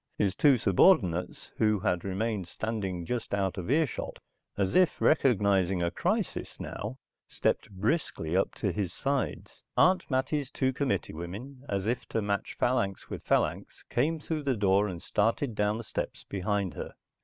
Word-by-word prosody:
His 100 Hz, -3 st, +2 dB
two 140 Hz, +4 st, +5 dB
subordinates 95 Hz, -, +3 dB
who 105 Hz, -2 st, +3 dB
had 90 Hz, -2 st, 0 dB
remained 100 Hz, 0 st, -2 dB
standing 95 Hz, -4 st, -3 dB
just 115 Hz, 0 st, -2 dB
out 95 Hz, -1 st, -1 dB
of 90 Hz, -, -5 dB
earshot, 150 Hz, 0 st, 0 dB, 0.4 s
as 95 Hz, -2 st, 0 dB
if 185 Hz, -2 st, +4 dB
recognizing 100 Hz, -, +3 dB
a 85 Hz, -, 0 dB
crisis -, -, -2 dB
now, -, -, -5 dB, 0.3 s
stepped -, -, 0 dB
briskly 100 Hz, -, -1 dB
up 95 Hz, -, +1 dB
to 100 Hz, -, -1 dB
his 95 Hz, -2 st, -2 dB
sides. 140 Hz, +7 st, -2 dB, 0.2 s
Aunt 185 Hz, 0 st, +4 dB
Mattie's 135 Hz, +1 st, 0 dB
two 130 Hz, -1 st, 0 dB
committee 140 Hz, 0 st, -1 dB
women, 100 Hz, -, -7 dB
as 100 Hz, -1 st, -1 dB
if 120 Hz, +2 st, -1 dB
to -, -, -1 dB
match 100 Hz, -1 st, -2 dB
phalanx 100 Hz, -6 st, 0 dB
with -, -, -4 dB
phalanx, -, -, 0 dB
came 155 Hz, +7 st, +1 dB
through 155 Hz, 0 st, -3 dB
the 135 Hz, -4 st, 0 dB
door 100 Hz, 0 st, +3 dB
and 90 Hz, -3 st, -6 dB
started 115 Hz, +4 st, +1 dB
down 105 Hz, +1 st, +1 dB
the 115 Hz, -, -6 dB
steps -, -, -4 dB
behind 100 Hz, -1 st, -1 dB
her. -, -, -7 dB
105 Hz, 160 wpm, -29 LUFS, 95-130 Hz, 0.4 s, two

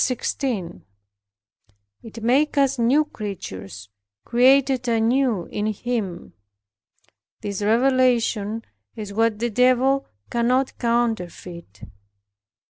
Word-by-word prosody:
It 225 Hz, 0 st, -10 dB
makes 280 Hz, +6 st, +2 dB
us 275 Hz, -2 st, +2 dB
new 265 Hz, +7 st, +3 dB
creatures, 100 Hz, -, -8 dB, 0.4 s
created 260 Hz, +1 st, +3 dB
anew 230 Hz, -3 st, +1 dB
in 210 Hz, +1 st, -3 dB
Him. 215 Hz, -4 st, -4 dB, 1.1 s
This 200 Hz, -1 st, -4 dB
revelation 230 Hz, -2 st, +2 dB, 0.3 s
is 210 Hz, -2 st, -7 dB
what 225 Hz, 0 st, +1 dB
the 235 Hz, +2 st, -2 dB
Devil 255 Hz, +4 st, +3 dB, 0.2 s
cannot 250 Hz, +3 st, +1 dB
counterfeit. 180 Hz, -, -2 dB
235 Hz, 80 wpm, -23 LUFS, 210-255 Hz, 1.1 s, new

